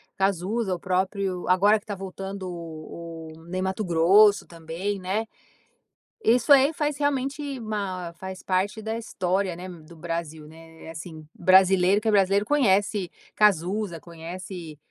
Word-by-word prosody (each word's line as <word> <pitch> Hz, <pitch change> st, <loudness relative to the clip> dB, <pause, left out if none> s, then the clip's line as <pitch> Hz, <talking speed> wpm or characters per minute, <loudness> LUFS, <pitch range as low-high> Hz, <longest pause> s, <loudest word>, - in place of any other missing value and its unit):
Cazuza, 195 Hz, +2 st, 0 dB
o -, -, -9 dB
próprio 185 Hz, 0 st, -1 dB
agora 205 Hz, +4 st, +5 dB
que -, -, -29 dB
tá 205 Hz, -, -4 dB
voltando, 195 Hz, 0 st, -6 dB
o 170 Hz, -1 st, -8 dB, 0.3 s
o 160 Hz, +1 st, -16 dB
Ney 185 Hz, +2 st, -3 dB
Matogrosso 190 Hz, +1 st, +4 dB
também, 170 Hz, +5 st, -5 dB
né. 195 Hz, +5 st, -2 dB, 1.0 s
Isso 240 Hz, +4 st, +3 dB
aí 280 Hz, +3 st, +7 dB
faz 295 Hz, -1 st, -1 dB
realmente, 280 Hz, 0 st, -1 dB
ma 195 Hz, -6 st, -4 dB
faz 190 Hz, -1 st, -7 dB
parte 195 Hz, +4 st, -1 dB
da 220 Hz, +1 st, -3 dB
história, 190 Hz, -4 st, -1 dB
né, 180 Hz, +2 st, -8 dB
do 170 Hz, -1 st, -12 dB
Brasil, 160 Hz, -2 st, -5 dB
né. 160 Hz, 0 st, -15 dB
É -, -, -9 dB
assim, 160 Hz, -1 st, -9 dB
brasileiro 190 Hz, +2 st, +4 dB
que 225 Hz, -, -4 dB
é 220 Hz, -, +4 dB
brasileiro, 200 Hz, 0 st, +3 dB
conhece 205 Hz, -, +2 dB, 0.3 s
Cazuza, 195 Hz, -2 st, +2 dB
conhece, 170 Hz, -1 st, -8 dB
190 Hz, 140 wpm, -25 LUFS, 170-210 Hz, 1.0 s, aí